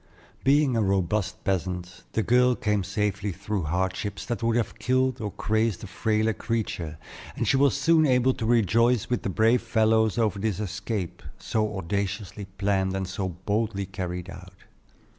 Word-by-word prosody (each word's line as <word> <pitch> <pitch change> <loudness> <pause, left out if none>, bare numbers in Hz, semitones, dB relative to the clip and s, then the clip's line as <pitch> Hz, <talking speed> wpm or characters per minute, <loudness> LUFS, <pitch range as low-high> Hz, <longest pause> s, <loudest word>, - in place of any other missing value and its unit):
Being 140 -1 +4
a 115 - +2
robust 95 0 0
peasant, 90 -2 -3
the 110 - +1
girl 125 +3 +4
came 105 -4 0
safely 100 +1 -1
through 100 0 -3
hardships 95 +5 -2
that 120 -1 -3
would 115 0 +1
have 115 -2 -1
killed 130 0 +1
or 105 - -2
crazed 110 0 0
a - - -4
frailer 110 +3 0
creature; 95 -10 -3 0.4
and - - -2
she - - +4
was 140 0 +3
soon 160 +1 +4
able 130 0 +3
to 115 - -4
rejoice 115 +1 +3
with 125 - +1
the - - -2
brave 115 +5 +3
fellows 110 -1 +2
over 110 -3 +1
this 105 -2 -1
escape, 105 -2 -4 0.2
so 110 -2 -1
audaciously 100 +3 -3
planned 95 -1 +1
and 95 -1 -2
so 95 0 -3
boldly 100 +3 -2
carried 90 -2 -5
out. 95 -1 -11
105 Hz, 160 wpm, -26 LUFS, 95-115 Hz, 0.4 s, Being